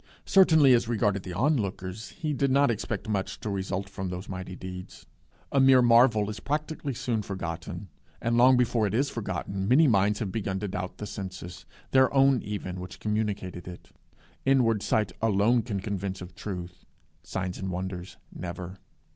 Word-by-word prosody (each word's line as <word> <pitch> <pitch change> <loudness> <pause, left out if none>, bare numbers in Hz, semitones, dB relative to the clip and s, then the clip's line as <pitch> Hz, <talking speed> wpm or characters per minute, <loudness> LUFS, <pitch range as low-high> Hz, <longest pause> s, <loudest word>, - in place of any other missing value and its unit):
Certainly, 160 -8 +6
as 120 -1 +3
regarded 105 -4 +1
the 90 -1 -7
onlookers, 105 - -1
he 155 -3 -3
did 140 0 +1
not 140 -1 +4
expect 110 -1 -4
much 100 -3 -2
to 105 - -3
result 95 0 -2
from 95 -1 -5
those 90 +2 -6
mighty 95 -1 -6
deeds. 90 0 -9 0.5
A 140 - +3
mere 130 -1 +6
marvel 115 -3 +5
is 105 - -7
practically 150 +1 -3
soon 115 -2 -1
forgotten, 90 0 -5 0.3
and 115 0 0
long 125 +2 +6
before 115 -3 +2
it 100 - -2
is 140 +4 +1
forgotten, 95 -2 -3
many 145 +7 +6
minds 105 -2 +3
have 105 -5 -3
begun 95 -2 -2
to 105 - -2
doubt 90 -1 -5
the 105 - -5
senses, 95 -3 -7 0.2
their 130 -1 +5
own 135 -2 +5
even, 95 -3 -5
which 90 +1 -8
communicated 100 -5 -2
it. 90 -1 -10 0.5
Inward 120 -6 +3
sight 105 -1 +1
alone 110 +2 +3
can 105 -3 -3
convince 95 -1 -3
of 90 0 -9
truth; 90 -2 -7 0.4
signs 95 -1 -4
and 95 - -3
wonders 90 0 -5 0.2
never. 90 +1 -7
100 Hz, 170 wpm, -27 LUFS, 95-120 Hz, 0.5 s, Certainly